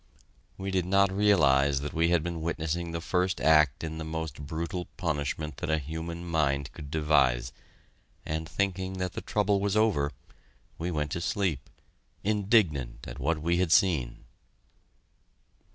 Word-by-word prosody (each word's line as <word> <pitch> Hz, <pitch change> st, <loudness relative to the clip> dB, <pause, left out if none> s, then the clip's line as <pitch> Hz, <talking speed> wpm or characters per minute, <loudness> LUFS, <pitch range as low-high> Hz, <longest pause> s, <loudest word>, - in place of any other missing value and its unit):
We 95 Hz, 0 st, -4 dB
did 90 Hz, -2 st, 0 dB
not 100 Hz, 0 st, +4 dB
realize 70 Hz, -9 st, +3 dB
that 75 Hz, -, -5 dB
we 85 Hz, +1 st, +2 dB
had 85 Hz, -3 st, +2 dB
been 85 Hz, -1 st, -4 dB
witnessing 85 Hz, +1 st, -2 dB
the 85 Hz, 0 st, -4 dB
first 90 Hz, +2 st, 0 dB
act 75 Hz, 0 st, +4 dB
in 80 Hz, 0 st, -4 dB
the -, -, -4 dB
most 80 Hz, -2 st, -5 dB
brutal 85 Hz, +3 st, -3 dB
punishment 75 Hz, 0 st, -2 dB
that 65 Hz, -, -4 dB
a 80 Hz, -, +3 dB
human 80 Hz, +3 st, -5 dB
mind 70 Hz, -4 st, 0 dB
could 75 Hz, -3 st, -9 dB
devise, 70 Hz, -6 st, +2 dB, 0.7 s
and, 80 Hz, 0 st, -3 dB
thinking 95 Hz, +1 st, -1 dB
that 90 Hz, -1 st, -3 dB
the -, -, -5 dB
trouble 105 Hz, -1 st, +1 dB
was 100 Hz, +1 st, 0 dB
over, 85 Hz, -10 st, +2 dB, 0.7 s
we 85 Hz, +2 st, -2 dB
went 75 Hz, -3 st, -2 dB
to 85 Hz, -, -2 dB
sleep, 90 Hz, -5 st, -1 dB, 0.5 s
indignant 95 Hz, -, +1 dB
at -, -, -8 dB
what 75 Hz, +3 st, -1 dB
we 85 Hz, +1 st, +2 dB
had 90 Hz, -3 st, +1 dB
seen. 70 Hz, -11 st, +2 dB
80 Hz, 150 wpm, -28 LUFS, 75-90 Hz, 0.7 s, not